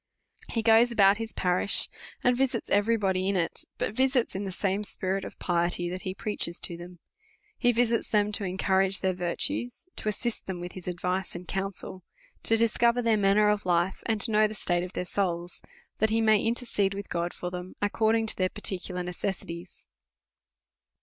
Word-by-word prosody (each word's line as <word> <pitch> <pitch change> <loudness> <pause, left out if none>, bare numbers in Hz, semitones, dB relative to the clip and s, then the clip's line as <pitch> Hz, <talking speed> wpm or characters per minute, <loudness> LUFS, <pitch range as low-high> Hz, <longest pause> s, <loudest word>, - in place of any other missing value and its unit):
He 225 - -1
goes 225 +2 +6
about 200 -3 +5
his 225 0 -2
parish, 180 +2 +3 0.4
and 250 0 +4
visits 255 -2 -1
every 220 +3 +3
body 190 -2 0
in 200 - 0
it; 170 -3 -1
but - - -2
visits 260 -2 +1
in 200 +1 -3
the 190 - -4
same 195 +2 -1
spirit 195 -1 -1
of - - -8
piety 175 0 0
that 185 +1 -4
he 185 -2 -4
preaches 205 -5 -2
to 170 - -1
them; 175 +1 -10 0.6
he 245 - +3
visits 235 -1 +1
them 210 -1 +2
to 210 0 -2
encourage 190 +1 +2
their 190 -1 +1
virtues, 240 - -1
to 215 - -1
assist 235 +2 -2
them 190 -2 -4
with 175 0 -6
his 185 -1 -10
advice 180 +1 -2
and 175 0 -8
counsel, 195 -1 -3 0.4
to 225 - +5
discover 235 +2 +3
their 230 -1 +3
manner 205 +1 +4
of 210 0 +2
life, 175 +1 +1
and 220 -2 +1
to 225 - +1
know 215 0 +5
the 215 - -7
state 175 -3 0
of 180 - -7
their 180 - -3
souls, 175 -2 -2 0.4
that 220 - +3
he 225 +1 +2
may 220 -2 +4
intercede 225 -4 0
with 200 0 -6
God 170 0 -2
for 180 - -6
them, 180 0 -7
according 220 +2 +2
to 220 - 0
their 185 -1 +1
parti 195 -2 -3
cular 180 -1 -5
necessities. 175 -1 -5
195 Hz, 190 wpm, -28 LUFS, 180-220 Hz, 0.6 s, goes